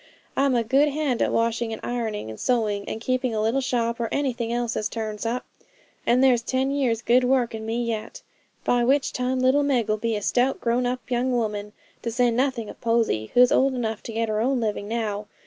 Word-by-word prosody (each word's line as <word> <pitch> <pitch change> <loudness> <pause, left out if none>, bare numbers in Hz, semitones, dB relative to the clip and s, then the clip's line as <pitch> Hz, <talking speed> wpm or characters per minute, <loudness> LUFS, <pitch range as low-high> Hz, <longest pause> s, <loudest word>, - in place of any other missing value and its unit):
I'm 275 -1 +2
a 235 - +2
good 275 +6 +3
hand 290 -4 -1
at - - +2
washing 230 0 0
and 220 - -5
ironing, 220 - -3
and 110 - -10
sewing, 215 -5 0
and 220 - -4
keeping 255 0 -1
a - - 0
little 225 +5 +1
shop, 235 -2 -1
or 230 -1 -1
anything 245 -5 -1
else 240 -1 -1
as 210 - -1
turns 220 -1 -4
up; 245 +2 -2 0.6
and 250 +2 +4
there's 250 -3 +5
ten 260 +3 0
years' 245 -5 0
good 250 +2 +4
work 250 -2 +2
in 220 0 -6
me 235 +2 -1
yet; 220 -1 -4 0.4
by 245 -1 +2
which 270 +3 +2
time 255 +1 -1
little 260 +3 +4
Meg'll 240 -7 +1
be 230 +1 -1
a 205 - -4
stout, 255 +5 +1
grown 245 +1 +1
up 250 0 -2
young 250 +1 +1
woman; 210 -4 -2 0.3
to 235 - -3
say 245 +1 +2
nothing 250 -2 0
of - - -11
Posy, 230 - +1
who's 250 0 +6
old 265 0 +3
enough 225 -3 -2
to - - -7
get 225 +1 0
her 215 0 0
own 260 +2 +1
living 210 -2 -2
now. 210 -2 -3
235 Hz, 215 wpm, -24 LUFS, 225-255 Hz, 0.6 s, who's